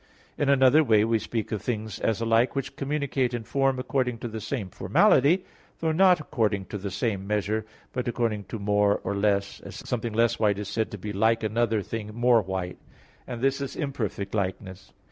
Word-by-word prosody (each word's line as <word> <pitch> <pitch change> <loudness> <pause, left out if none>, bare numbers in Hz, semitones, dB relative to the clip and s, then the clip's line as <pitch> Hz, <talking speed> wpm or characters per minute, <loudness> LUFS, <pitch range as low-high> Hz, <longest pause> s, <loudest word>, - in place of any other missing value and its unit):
In 145 - 0
another 135 +2 +6
way, 110 -5 +4
we 115 0 +2
speak 110 +1 -4
of 105 -3 -2
things 110 -2 -3
as 110 -1 0
alike 115 +3 +2
which 135 -2 -3
communicate 140 -3 -1
in 120 - -4
form 135 +2 +1
according 125 -1 -1
to 120 - -5
the 110 -1 -6
same 105 -4 -4
formality, 165 +8 +3 0.3
though 160 -1 0
not 180 +1 +5
according 105 -9 -1
to 105 - -2
the 100 +1 -4
same 100 -1 -2
measure, 105 +1 -1 0.3
but 125 -2 -2
according 115 -4 -1
to 115 - -6
more 105 0 +2
or - - -2
less, 100 -1 0
as - - -10
something 115 -2 -2
less 115 +1 +2
white 105 -2 +2
is 105 -1 -5
said 110 +1 -1
to 105 - -7
be 105 +2 -6
like 110 +3 +2
another 110 -1 +1
thing 105 +1 -6
more 120 -1 +4
white; 95 -2 -4 0.5
and 120 -2 -6
this 135 +1 +1
is 140 - -4
imperfect 110 - -3
likeness. 95 -1 -4
110 Hz, 195 wpm, -26 LUFS, 105-125 Hz, 0.5 s, another